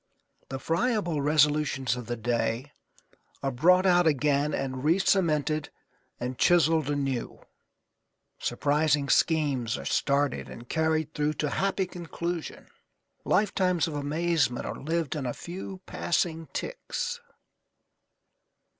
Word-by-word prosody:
The 135 - -3
friable 170 - 0
resolutions 150 -3 +2
of 125 -2 -7
the 120 - -2
day 120 +3 -1 0.7
are 135 - 0
brought 180 +9 +4
out 175 -2 +5
again 145 0 +2
and 130 -2 -3
recemented 155 -3 +2 0.5
and 125 +1 -4
chiselled 165 -4 +4
anew. 135 -4 -2 1.0
Surprising 145 +2 +1
schemes 140 -8 +2
are - - -8
started 140 -1 0
and 120 +1 -10
carried 160 0 0
through 150 0 0
to 150 -1 -2
happy 195 -1 0
conclusion, 170 -1 -5 0.6
lifetimes 185 -3 +2
of 160 - -5
amazement 145 -2 0
are - - -3
lived 165 +1 -2
in 140 -4 -3
a 120 - -3
few 185 +2 -7
passing 165 -2 -1
ticks. 485 0 -4
150 Hz, 110 wpm, -28 LUFS, 140-170 Hz, 1.0 s, out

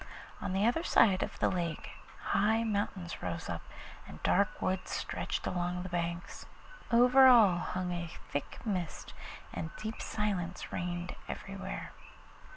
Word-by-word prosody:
On - - -2
the 195 +2 +2
other 245 +8 +3
side 200 - +5
of - - -3
the - - +2
lake 170 -3 -3 0.4
high 220 +3 +3
mountains 200 -5 -2
rose 90 -2 -3
up, - - -3 0.5
and 75 - -9
dark 200 +1 +2
woods 185 0 -1
stretched - - -3
along 180 0 -1
the 185 - -5
banks; 170 0 -3 0.4
over 250 +3 +8
all 220 -8 +7
hung 185 0 -2
a 170 -1 -3 0.2
thick 145 - -4
mist, 185 -7 -3 0.4
and 160 - -3
deep 220 +1 -5
silence 190 -5 -2
reigned 175 0 -3
everywhere. 195 0 -6
185 Hz, 140 wpm, -32 LUFS, 175-210 Hz, 0.5 s, over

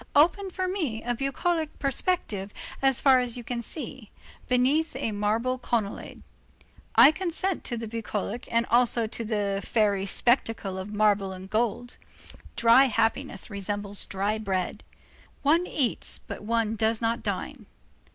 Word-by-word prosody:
Open 350 +7 +4
for 370 0 -2
me 310 - -2
a 245 - -1
bucolic 310 +5 -1
perspective 265 - -1 0.3
as 270 -2 +3
far 265 -2 +6
as 245 -1 -2
you 240 - -6
can 235 0 -3
see, 250 -3 -8 0.4
beneath 270 +6 +2
a 225 - -2
marble 220 +5 0
colonnade. 225 -5 -3 0.7
I 240 +6 +9
consent 365 +2 -2
to 240 - -2
the 225 0 -5
bucolic 225 0 -4
and 230 0 +2
also 240 -1 +4
to 230 +1 -5
the 205 -3 -1
fairy 205 -3 +1
spectacle 225 -5 0
of 190 +2 -6
marble 205 -2 +2
and 185 0 -9
gold. 235 +3 -1 0.6
Dry 235 +3 +6
happiness 225 -4 -1
resembles 200 0 -4
dry 205 +3 -1
bread. 190 -4 -2 0.6
One 330 +5 +3
eats, 255 -6 -1
but - - -9
one 225 0 0
does 220 +1 +1
not 230 +1 0
dine. - - -4
230 Hz, 140 wpm, -27 LUFS, 210-265 Hz, 0.7 s, I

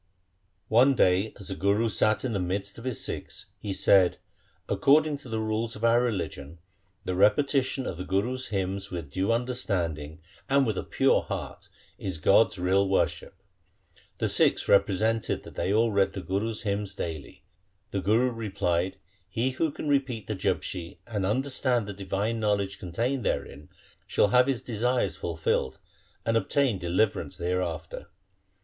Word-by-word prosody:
One 130 +5 +5
day 95 0 +3
as 100 - -7
the 95 - -3
Guru 100 +4 +2
sat 110 +2 +2
in 120 - -1
the 100 - 0
midst 100 +3 -3
of 115 - -11
his 130 -4 -3
Sikhs - - -5
he 100 0 -4
said, 95 -1 +4 0.3
' - - -38
According 150 +1 +4
to 135 - -12
the 110 - -2
rules 110 +1 -2
of 105 - -9
our 115 +1 +5
re 120 - +1
ligion 75 -6 -5 0.5
the 90 - -1
repetition 130 +7 +2
of 85 - -4
the 90 - -4
Gurus' 120 +8 -1
hymns 95 -1 -2
with 85 -6 -6
due 95 +8 0
understanding 90 - -2 0.3
and 140 0 +4
with 110 -4 -1
a - - -3
pure - - +2
heart - - -6 0.3
is 95 -4 -2
God's 95 +7 +4
real 95 +2 +2
worship.' 95 - -1 0.7
The - - 0
Sikhs - - +3
represented 110 +3 +2
that - - -11
they 95 - -1
all 115 +2 +3
read 100 -1 +2
the 95 - -5
Gurus' 105 +6 -2
hymns 100 -1 -2
daily. 80 -6 -6 0.5
The 100 - -1
Guru 115 +6 +2
re 115 -2 -5
plied, 90 -1 0 0.2
' - - -39
He 115 +7 0
who 155 +5 0
can 150 - -6
repeat 130 -7 0
the 110 - -3
Japji 85 -2 -2
and 105 -5 -2
under 130 +7 0
stand 125 -4 +1
the 105 - -6
divine 100 +4 -2
knowledge 100 -2 0
contained 115 +9 -2
therein, 75 -5 -3 0.4
shall 105 - +3
have 125 +3 +5
his 130 -2 -1
desires 120 -5 0
fulfilled, 80 -6 -1 0.5
and 115 - +1
obtain 125 -2 +1
deliverance 90 +4 0
hereafter.' 90 - -3
105 Hz, 170 wpm, -27 LUFS, 95-120 Hz, 0.7 s, One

